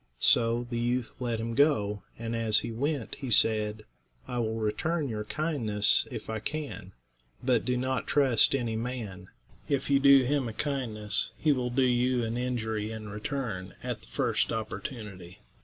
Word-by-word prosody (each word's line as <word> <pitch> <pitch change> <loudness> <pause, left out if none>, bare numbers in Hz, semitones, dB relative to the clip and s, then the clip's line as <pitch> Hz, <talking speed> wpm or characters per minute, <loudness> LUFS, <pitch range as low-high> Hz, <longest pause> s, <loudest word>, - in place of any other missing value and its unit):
So 115 - +3
the 120 -1 -3
youth 120 0 -1
let 120 -3 -1
him 115 +1 -3
go; 105 -8 +2 0.2
and 115 0 -4
as 110 -2 +4
he - - -4
went 140 +2 -2
he 135 -3 -4
said, 110 -1 +2 0.4
"I 125 - -3
will 110 -1 -1
return 145 +9 -1
your 105 -2 -3
kindness 115 -9 +1
if - - -7
I 110 0 -3
can, 140 -8 -5 0.5
but 125 -3 +2
do 125 0 +1
not 130 +1 -1
trust 135 -4 +4
any 120 -4 -1
man; 110 -6 -5 0.4
if 140 0 0
you 140 - +5
do 140 -1 +7
him 135 -2 0
a - - -7
kindness 110 -7 0
he 155 - +2
will 125 -3 0
do 130 +2 +2
you 125 0 +2
an 115 0 -2
injury 110 -4 -2
in 110 -1 -7
return 105 -3 -4
at - - -4
the - - -18
first - - 0
opportunity." 105 - -6
115 Hz, 170 wpm, -29 LUFS, 110-130 Hz, 0.5 s, do